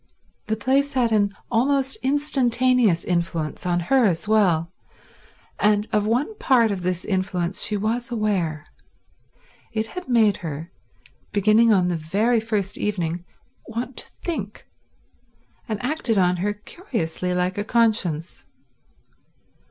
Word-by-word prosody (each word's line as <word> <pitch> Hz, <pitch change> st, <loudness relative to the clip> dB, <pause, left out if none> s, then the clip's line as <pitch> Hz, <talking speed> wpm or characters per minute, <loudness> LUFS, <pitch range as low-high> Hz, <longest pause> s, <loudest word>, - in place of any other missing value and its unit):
The 220 Hz, -, 0 dB
place 270 Hz, +6 st, +1 dB
had 245 Hz, -3 st, +2 dB
an 205 Hz, -2 st, +3 dB, 0.2 s
almost 270 Hz, +3 st, +2 dB
instantaneous 255 Hz, -, +2 dB
influence 170 Hz, -2 st, -2 dB
on 175 Hz, 0 st, +1 dB
her 260 Hz, +7 st, +3 dB
as 175 Hz, 0 st, 0 dB
well, 180 Hz, -6 st, +2 dB, 0.9 s
and 210 Hz, 0 st, +2 dB
of 210 Hz, 0 st, +1 dB
one 255 Hz, -, 0 dB
part 240 Hz, -, +3 dB
of 195 Hz, -2 st, -3 dB
this 180 Hz, 0 st, -2 dB
influence 185 Hz, -2 st, -1 dB
she 210 Hz, -, 0 dB
was 230 Hz, +4 st, -2 dB
aware: 195 Hz, -10 st, -1 dB, 1.1 s
it 220 Hz, -1 st, -1 dB
had 360 Hz, +7 st, -8 dB
made 220 Hz, -5 st, +4 dB
her, 160 Hz, -2 st, -6 dB, 0.6 s
beginning 215 Hz, +3 st, +4 dB
on 185 Hz, -4 st, +3 dB
the 175 Hz, -1 st, 0 dB
very 205 Hz, +9 st, +1 dB
first 210 Hz, -3 st, -2 dB
evening, 175 Hz, -4 st, -2 dB, 0.4 s
want 235 Hz, +3 st, -5 dB
to -, -, -4 dB, 0.2 s
think, 215 Hz, -, -4 dB, 1.0 s
and 215 Hz, -2 st, -2 dB
acted 260 Hz, -6 st, 0 dB
on 180 Hz, -1 st, +3 dB
her 205 Hz, +4 st, -1 dB
curiously 195 Hz, -, -4 dB
like 180 Hz, +2 st, 0 dB
a -, -, 0 dB
conscience. 210 Hz, -8 st, 0 dB
210 Hz, 130 wpm, -23 LUFS, 180-240 Hz, 1.1 s, made